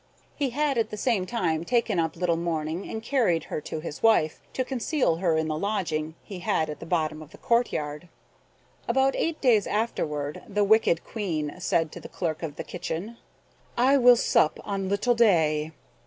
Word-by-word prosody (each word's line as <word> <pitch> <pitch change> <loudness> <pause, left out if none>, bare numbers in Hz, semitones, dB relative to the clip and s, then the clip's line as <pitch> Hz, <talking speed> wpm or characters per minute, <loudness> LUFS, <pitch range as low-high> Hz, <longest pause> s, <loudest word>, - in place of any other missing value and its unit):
He 280 -2 0
had 280 0 0
at 225 - 0
the 210 - -6
same 205 -5 0
time 170 -8 -1
taken 230 -3 +1
up 160 -1 -1
little 170 -1 +1
Morning, 165 +1 -3
and 220 0 -5
carried 225 - +1
her - - -5
to 155 - -5
his 155 -2 -7
wife, 215 -9 +3
to 260 - -1
conceal 255 - 0
her 170 -3 +1
in 160 0 0
the 155 - -1
lodging 160 -6 -2
he 195 -4 -8
had 160 -2 0
at 150 - -8
the 165 - -9
bottom 155 -3 -1
of 155 - -11
the - - -15
courtyard. 170 -9 -1 0.8
About 265 +3 +2
eight 330 -1 -1
days 230 -7 +4
afterward 150 -10 -2
the 205 -1 +1
wicked 200 -5 +3
Queen 160 -9 -3
said 165 -3 0
to - - -8
the - - -10
clerk 160 -2 -3
of 160 -4 -5
the - - -5
kitchen, 180 +6 -5 0.6
"I 265 +3 +5
will 245 -1 +8
sup 155 -8 +2
on 195 -2 -2
little 205 +5 +2
Day." 160 -9 +3
180 Hz, 185 wpm, -26 LUFS, 160-230 Hz, 0.8 s, will